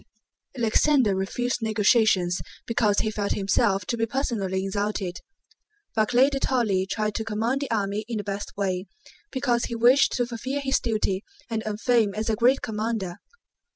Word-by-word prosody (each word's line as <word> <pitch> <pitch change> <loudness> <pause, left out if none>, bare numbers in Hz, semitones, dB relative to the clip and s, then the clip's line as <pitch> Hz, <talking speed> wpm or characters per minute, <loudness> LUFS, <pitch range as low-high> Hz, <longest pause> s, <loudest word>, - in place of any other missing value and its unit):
Alexander 240 0 +3
refused 245 +6 -2
negotiations 210 -4 +3 0.2
because 215 -3 +2
he 220 - -1
felt 205 -1 -1
himself 195 0 +1
to 235 - -1
be 225 -1 -1
personally 205 -7 -1
insulted. 195 -2 -2 0.8
Barclay 245 +5 +4
de 275 - -1
Tolly 215 -9 +1
tried 215 +1 -1
to 220 - -2
command 225 +5 -1
the 280 - -3
army 205 -2 -1
in 230 -2 -3
the 205 - -3
best 200 0 -5
way, 190 -1 -1 0.4
because 250 -3 0
he 235 - -4
wished 245 +4 +5
to 245 - +1
fulfill 250 +4 -4
his 270 -1 +1
duty 210 -4 -1 0.3
and 225 -1 -1
earn 210 -1 -2
fame 225 -3 +2
as 220 +1 -1
a - - +1
great 250 +5 +3
commander. 215 -5 -3
220 Hz, 160 wpm, -25 LUFS, 200-240 Hz, 0.8 s, wished